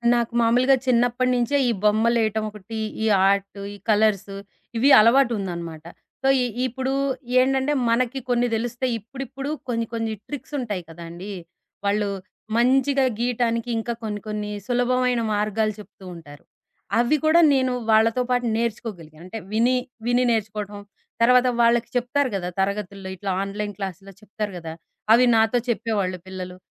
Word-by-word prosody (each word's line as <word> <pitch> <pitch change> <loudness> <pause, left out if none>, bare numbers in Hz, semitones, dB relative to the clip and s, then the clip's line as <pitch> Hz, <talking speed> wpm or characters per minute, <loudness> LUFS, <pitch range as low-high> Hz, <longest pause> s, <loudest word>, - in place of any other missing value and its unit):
నాకు 235 0 0
మామూలుగా 250 +4 +4
చిన్నప్పటి 245 +1 +2
నుంచే 245 +4 0
ఈ - - +3
బొమ్మలేయటం 220 0 +2
ఒకటి, 210 +2 -9 0.3
ఈ - - +1 0.2
ఆర్టు, 200 0 0
ఈ - - -12
కలర్సు 205 -2 +2 0.4
ఇవి 260 +5 +4
అలవాటుందన్నమాట. 195 - +1 0.4
సో, - - +2 0.2
ఇ - - +1 0.2
ఇప్పుడు 260 +2 -3 0.5
ఏంటంటే 265 +2 +2 0.2
మనకి 250 +3 +1
కొన్ని 245 0 +2
తెలుస్తాయి. 240 +2 -2
ఇప్పుడిప్పుడు 270 +4 -7 0.2
కొన్ని, 230 -1 -1
కొన్ని 225 -1 -2
ట్రిక్సుంటాయి 250 -9 -4
కదండీ! 170 +4 -8 0.5
వాళ్ళు 205 0 +1 0.5
మంచిగా 265 +2 +3
గీయటానికి 235 -1 0
ఇంకా 235 +1 -3
కొన్ని, 210 -2 -4
కొన్ని 210 -1 -4 0.2
సులభమైన 245 0 +1
మార్గాలు 215 +1 0
చెప్తూ 195 -2 -14
ఉంటారు. 145 -3 -13 0.6
అవి 245 +6 +3
కూడా 330 +2 +6
నేను 260 -2 +1 0.2
వాళ్ళతో 225 +3 +4
పాటు 245 0 +1
నేర్చుకోగలిగాను. 205 -9 -4
అంటే 205 +5 -7
విని 235 +4 +3 0.3
విని 245 +1 +2
నేర్చుకోవడం. 210 -2 -3 0.4
తర్వాత 250 +1 +5
వాళ్ళకి 235 0 +3
చెప్తారు 250 +2 +1
గదా 180 -2 -3
తరగతుల్లో 195 -1 -2
ఇట్లా 195 +1 -4
ఆన్‌లైన్ 205 +1 -4
క్లాస్‌లో 195 0 -6
చెప్తారు 210 -1 -5
గదా! 165 -2 -7 0.4
అవి 245 +2 +6
నాతో 225 +2 +3
చెప్పేవాళ్ళు 205 -5 -1
పిల్లలు. 185 -1 -7
225 Hz, 135 wpm, -23 LUFS, 200-245 Hz, 0.6 s, కూడా